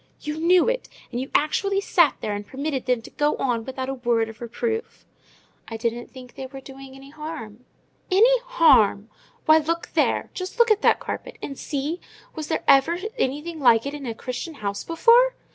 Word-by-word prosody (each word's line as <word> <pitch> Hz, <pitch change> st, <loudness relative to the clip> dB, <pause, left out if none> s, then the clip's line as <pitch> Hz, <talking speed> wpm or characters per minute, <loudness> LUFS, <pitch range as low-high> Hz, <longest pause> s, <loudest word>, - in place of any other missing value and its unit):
"You 300 Hz, +1 st, -4 dB
knew 350 Hz, +2 st, +4 dB
it! -, -, -1 dB, 0.2 s
and 240 Hz, 0 st, -3 dB
you 265 Hz, -, -6 dB
actually 390 Hz, +6 st, +1 dB
sat 340 Hz, -6 st, +3 dB
there 210 Hz, -, -2 dB
and 205 Hz, 0 st, -4 dB
permitted 270 Hz, 0 st, -4 dB
them 250 Hz, -2 st, +1 dB
to -, -, -12 dB
go 295 Hz, 0 st, +1 dB
on 235 Hz, -4 st, -1 dB
without 260 Hz, 0 st, -5 dB
a 270 Hz, -, -2 dB
word 235 Hz, -3 st, 0 dB
of 225 Hz, 0 st, -13 dB
reproof!" 445 Hz, -, -4 dB, 0.6 s
"I 225 Hz, -, -6 dB
didn't 235 Hz, +1 st, -3 dB
think 255 Hz, -2 st, -13 dB
they 265 Hz, -, -7 dB
were 270 Hz, +1 st, -10 dB
doing 270 Hz, 0 st, -12 dB
any 270 Hz, +1 st, -13 dB
harm." 300 Hz, -7 st, -8 dB, 0.4 s
"Any 465 Hz, +7 st, +5 dB
harm! 285 Hz, -, +3 dB, 0.3 s
Why, 315 Hz, 0 st, +6 dB
look 335 Hz, +2 st, -2 dB
there! -, -, +1 dB
Just 370 Hz, +5 st, -6 dB
look 470 Hz, -2 st, +4 dB
at 430 Hz, 0 st, +3 dB
that -, -, +4 dB
carpet, -, -, -6 dB
and 275 Hz, -, -6 dB
see—was 300 Hz, +2 st, -6 dB
there -, -, -2 dB
ever 275 Hz, +5 st, +5 dB, 0.2 s
anything 300 Hz, +4 st, -2 dB
like 235 Hz, -4 st, +4 dB
it 280 Hz, -, -4 dB
in 285 Hz, -3 st, -6 dB
a 230 Hz, -, -4 dB
Christian 255 Hz, +8 st, -6 dB
house 200 Hz, -5 st, -4 dB
before? 475 Hz, +9 st, +4 dB
275 Hz, 190 wpm, -24 LUFS, 245-335 Hz, 0.6 s, Why